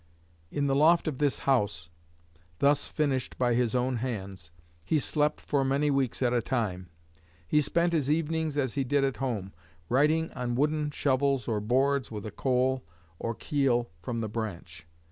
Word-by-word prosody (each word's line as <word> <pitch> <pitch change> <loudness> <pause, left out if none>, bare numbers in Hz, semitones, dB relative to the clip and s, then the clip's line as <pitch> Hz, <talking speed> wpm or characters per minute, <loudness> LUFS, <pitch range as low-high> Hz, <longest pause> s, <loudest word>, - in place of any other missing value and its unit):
In 145 +7 -1
the 135 -1 +2
loft 160 +4 +4
of 145 -5 -2
this 145 -2 +2
house, 100 - +1 0.7
thus 140 - +3
finished 140 -5 -1
by 120 -1 +2
his 120 -1 +1
own 125 0 +1
hands, 100 -8 -5 0.3
he 155 - +1
slept 150 +1 0
for 140 -2 0
many 140 +2 +1
weeks 135 -2 0
at 120 -1 +2
a 120 - +2
time. 95 -8 -2 0.6
He 150 - +3
spent 170 +4 +1
his 145 -4 +1
evenings 160 -1 0
as 130 -5 0
he 140 - 0
did 140 +2 +1
at 135 -1 0
home, 110 -8 -3 0.4
writing 155 +5 +2
on 125 -2 -3
wooden 150 +2 +1
shovels 140 -3 +1
or 110 -2 0
boards 135 +4 +1
with 105 -2 -6
'a 110 - -5
coal, 130 +2 +1 0.4
or 115 0 -3
keel, 130 - 0
from 115 +2 -3
the 110 - -2
branch.' 85 -6 -6
130 Hz, 170 wpm, -28 LUFS, 115-145 Hz, 0.7 s, loft